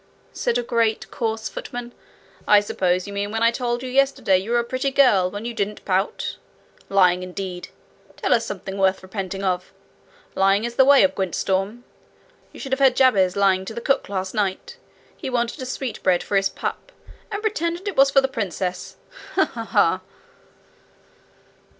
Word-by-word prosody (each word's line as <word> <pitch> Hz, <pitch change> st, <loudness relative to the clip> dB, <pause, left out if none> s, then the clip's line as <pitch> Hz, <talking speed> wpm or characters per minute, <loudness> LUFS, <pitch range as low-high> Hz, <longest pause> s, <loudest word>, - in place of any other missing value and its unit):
said 240 Hz, 0 st, 0 dB
a 245 Hz, -, -1 dB
great, 230 Hz, -2 st, 0 dB
coarse 220 Hz, -1 st, -2 dB
footman. 245 Hz, 0 st, -7 dB, 0.5 s
'I 205 Hz, -1 st, +6 dB
suppose 185 Hz, -3 st, 0 dB
you 200 Hz, -, -8 dB
mean 200 Hz, 0 st, -2 dB
when 225 Hz, +2 st, -1 dB
I 230 Hz, -, +5 dB
told 240 Hz, 0 st, -2 dB
you -, -, -4 dB
yesterday 270 Hz, -7 st, +2 dB
you 195 Hz, +4 st, -7 dB
were 240 Hz, -, +2 dB
a 235 Hz, -, +2 dB
pretty 255 Hz, +3 st, -2 dB
girl 245 Hz, -10 st, +4 dB
when 205 Hz, +4 st, -7 dB
you 240 Hz, -, -3 dB
didn't 210 Hz, -1 st, -3 dB
pout? 190 Hz, +1 st, -1 dB, 0.5 s
Lying, 180 Hz, -2 st, +4 dB
indeed! 185 Hz, 0 st, -6 dB, 0.5 s
Tell -, -, +1 dB
us -, -, +2 dB
something 195 Hz, 0 st, -6 dB
worth 190 Hz, 0 st, +2 dB
repenting 195 Hz, 0 st, -5 dB
of! 180 Hz, -1 st, -1 dB, 0.6 s
Lying 195 Hz, +2 st, +3 dB
is 235 Hz, -, -4 dB
the 265 Hz, -, +5 dB
way 280 Hz, -3 st, +7 dB
of 190 Hz, 0 st, +3 dB
Gwyntystorm. 195 Hz, +4 st, -1 dB, 0.7 s
You -, -, -13 dB
should 270 Hz, -, -7 dB
have 265 Hz, -, +1 dB
heard 265 Hz, -2 st, +5 dB
Jabez 195 Hz, -9 st, +4 dB
lying 195 Hz, -2 st, +3 dB
to 220 Hz, -, -7 dB
the -, -, -3 dB
cook 275 Hz, 0 st, 0 dB
last 190 Hz, -1 st, -3 dB
night! 205 Hz, -, -2 dB, 0.4 s
He -, -, -6 dB
wanted 240 Hz, +2 st, -1 dB
a 255 Hz, -, -5 dB
sweetbread 225 Hz, -9 st, -1 dB
for 205 Hz, -, -3 dB
his 195 Hz, 0 st, +3 dB
pup, -, -, -5 dB, 0.4 s
and 410 Hz, +1 st, -4 dB
pretended 345 Hz, -3 st, -2 dB
it 400 Hz, -, -3 dB
was 275 Hz, 0 st, +6 dB
for 275 Hz, 0 st, +4 dB
the 265 Hz, -, +1 dB
princess! 185 Hz, -6 st, -4 dB, 0.4 s
Ha! -, -, +4 dB
ha! -, -, -7 dB
ha!' -, -, +2 dB
215 Hz, 180 wpm, -22 LUFS, 190-255 Hz, 0.7 s, way